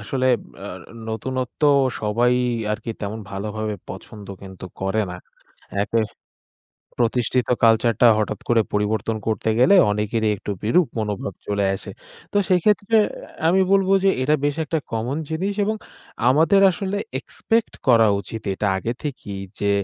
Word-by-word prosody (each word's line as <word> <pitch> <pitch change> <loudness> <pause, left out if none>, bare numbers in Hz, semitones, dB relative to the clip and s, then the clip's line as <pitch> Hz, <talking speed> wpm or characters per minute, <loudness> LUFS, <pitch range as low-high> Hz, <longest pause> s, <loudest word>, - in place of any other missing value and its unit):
আসলে 130 +5 -1 0.4
আ - - -5 0.4
নতুনত্ব 125 +3 -4 0.4
সবাই 115 +3 +2 0.4
আরকি 105 +2 -4
তেমন 105 +2 -4
ভালোভাবে 105 +2 -3
পছন্দ 105 -2 -9 0.2
কিন্তু 95 -1 -10 0.2
করে 95 +3 0
না। 90 - -6 0.7
একে 115 +2 0 1.0
প্রতিষ্ঠিত 120 +1 +1 0.2
কালচারটা 115 +1 +4
হঠাৎ 110 - -2
করে 120 -1 +4
পরিবর্তন 105 +2 0
করতে 110 0 -1
গেলে 180 +11 +6 0.2
অনেকেরই 105 +1 0
একটু 100 - -7
বিরূপ 155 +11 +3
মনোভাব 105 -2 -3
চলে 100 -1 0
আসে। 95 - -7 0.4
তো - - -1
সেক্ষেত্রে 200 +4 +3 0.5
আমি 185 +3 +4
বলব 195 -1 +4 0.2
যে - - +5
এটা 150 +4 +3
বেশ 145 0 +1
একটা 160 +2 -1
কমন 115 +5 -2
জিনিস 185 +6 -1
এবং 215 +2 -1 0.5
আমাদের 160 +9 +4
আসলে 195 +2 -3 0.2
এক্সপেক্ট 225 -1 -1 0.2
করা 115 -3 +6
উচিত। 110 +3 -7
এটা 105 - -2
আগে 115 +5 -2
থেকেই 120 -9 -5 0.2
যে 100 - +1
115 Hz, 135 wpm, -22 LUFS, 105-145 Hz, 1.0 s, গেলে